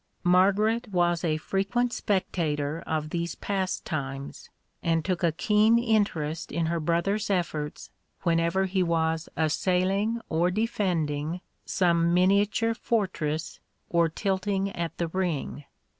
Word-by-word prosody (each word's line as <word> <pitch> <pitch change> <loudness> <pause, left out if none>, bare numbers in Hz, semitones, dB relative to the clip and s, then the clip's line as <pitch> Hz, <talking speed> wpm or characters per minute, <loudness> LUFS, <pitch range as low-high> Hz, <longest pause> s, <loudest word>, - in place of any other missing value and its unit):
(1) 175 - +3
Margaret 210 +6 +3
was 175 -2 +1
a 155 -2 +1
frequent 200 +9 0
spectator 160 -6 -1
of 155 -1 -2
these 170 0 -2
pastimes, 145 -8 -3 0.3
and 165 -1 +1
took 185 -2 -1
a 170 -2 +3
keen 210 +7 +3
interest 200 -9 0
in 170 - 0
her 170 +1 0
brother's 170 +6 0
efforts 155 -6 -2 0.3
whenever 170 +2 +2
he 190 0 0
was 160 -2 0
assailing 185 +7 +1
or 170 +2 +2
defending 175 -7 -1 0.3
some 170 -1 +2
miniature 200 +5 +3
fortress 180 -9 -2 0.3
or 170 -1 +3
tilting 195 +2 -1
at 170 -1 -4
the 170 - -1
ring. 165 -5 -2
175 Hz, 120 wpm, -27 LUFS, 160-195 Hz, 0.3 s, 1